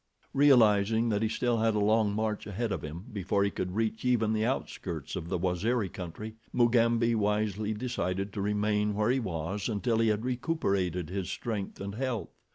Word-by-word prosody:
Realizing 115 -5 +5
that 105 -1 +1
he 110 - +1
still 120 0 0
had 110 -1 +2
a - - +2
long 105 0 +3
march 110 -1 -2
ahead 110 +3 -2
of - - -2
him 80 +6 -7
before 100 0 0
he 100 - +1
could 90 -1 -4
reach 110 0 -1
even 115 -4 +2
the 110 0 +1
outskirts 90 - -3
of 85 -3 -5
the 90 - 0
Waziri 95 +5 0
country, 95 +6 -7 0.2
Mugambi 115 -1 +3
wisely 105 0 0
decided 100 -5 -2
to 100 - -3
remain 105 0 +1
where 105 +3 +2
he 130 - +2
was 95 0 -3
until 110 +2 0
he 115 - +3
had 110 +2 +1
recuperated 100 - -1
his 95 -2 -3
strength 105 -5 -4
and 100 0 -5
health. 125 -1 -2
105 Hz, 180 wpm, -29 LUFS, 100-115 Hz, 0.2 s, Realizing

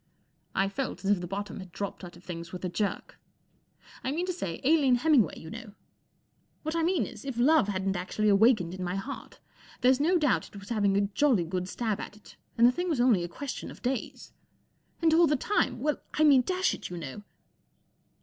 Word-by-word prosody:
I 195 - +2
felt 225 0 -4
as 200 - +3
if 195 -3 +2
the 175 - -5
bottom 200 +3 -5
had 185 -2 -10
dropped 200 +2 -5
out 175 -1 -9
of 175 - -18
things 170 -2 -7
with 180 0 -6
a - - -1
jerk. 200 +3 -3 0.8
I 260 - -1
mean 335 +5 -1
to 365 - -2
say, 180 - -4
Aline 280 -3 +4
Hemmingway, 245 - +3
you 160 - -10
know. 230 -3 -9 0.9
What 315 +1 -3
I 335 - +1
mean 350 +1 +1
is, - - -10
if 270 -4 -5
Love 275 -1 +4
hadn't 195 -1 -1
actually 185 +4 -1
awakened 205 -3 +4
in 185 0 -5
my 180 +1 -2
heart, 230 +9 -7 0.4
there's 255 +1 +4
no 345 +5 +3
doubt 295 -5 +1
it - - -18
was 200 - -12
having 205 -4 +2
a - - +3
jolly 205 +1 +2
good 180 +2 -3
stab 220 -2 -2
at 210 - -8
it, 210 - -17 0.2
and 230 - +6
the 245 - +7
thing 355 +7 -3
was 305 -7 0
only 240 -8 +4
a - - -3
question 270 +10 -6
of - - -13
days. 250 -2 -4 0.7
And 320 -1 +5
all 335 +1 +6
the 300 - +2
time—well, 300 -2 0 0.2
I 310 - +3
mean, 280 -4 +7
dash 370 +7 0
it, - - -7
you 175 - -6
know. 160 +4 -7
220 Hz, 215 wpm, -28 LUFS, 190-285 Hz, 0.9 s, the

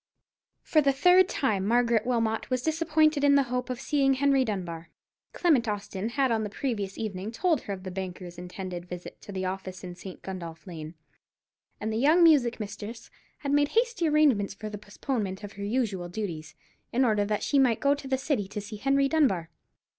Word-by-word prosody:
For 310 - +3
the 280 -1 +3
third 360 +6 +5
time 210 -8 0
Margaret 235 +1 +2
Wilmot 225 -3 0
was 255 -1 -1
disappointed 315 -2 +2
in 285 0 +6
the 280 - +5
hope 250 0 -1
of 250 -1 -3
seeing 270 0 +2
Henry 275 0 +3
Dunbar. 175 -7 -4 0.4
Clement 290 -10 +2
Austin 205 0 -3
had 265 +1 +1
on 220 -1 +1
the 210 - -3
previous 205 -4 -3
evening 205 -1 -4
told 320 +4 +1
her 200 - -5
of 185 -1 -8
the 185 - -5
banker's 180 -2 -6
intended 180 0 -6
visit 180 0 -8
to - - -10
the 190 -1 -3
office 185 0 -5
in 180 -1 -6
St. 185 +1 -10
Gundolph 170 -4 -7
Lane, 165 -3 -8 0.8
and 220 +1 -2
the - - -1
young 310 +7 +5
music 275 -9 +5
mistress 210 +2 -7 0.3
had 280 -2 -2
made 290 0 +4
hasty 465 -8 +2
arrangements 280 -11 +3
for 215 +1 -6
the 210 - -6
postponement 205 -2 -4
of 205 0 -7
her 200 - -7
usual 200 -5 -1
duties, 175 -5 -5 0.4
in 255 +2 +3
order 210 -3 +2
that 210 0 -1
she 285 - +2
might 245 -5 +3
go 280 0 +3
to 285 -1 -6
the 265 0 +1
City 265 -7 -1
to 210 +2 -5
see 210 +1 -7
Henry 275 +4 +2
Dunbar. 210 - +1
220 Hz, 195 wpm, -28 LUFS, 190-275 Hz, 0.8 s, in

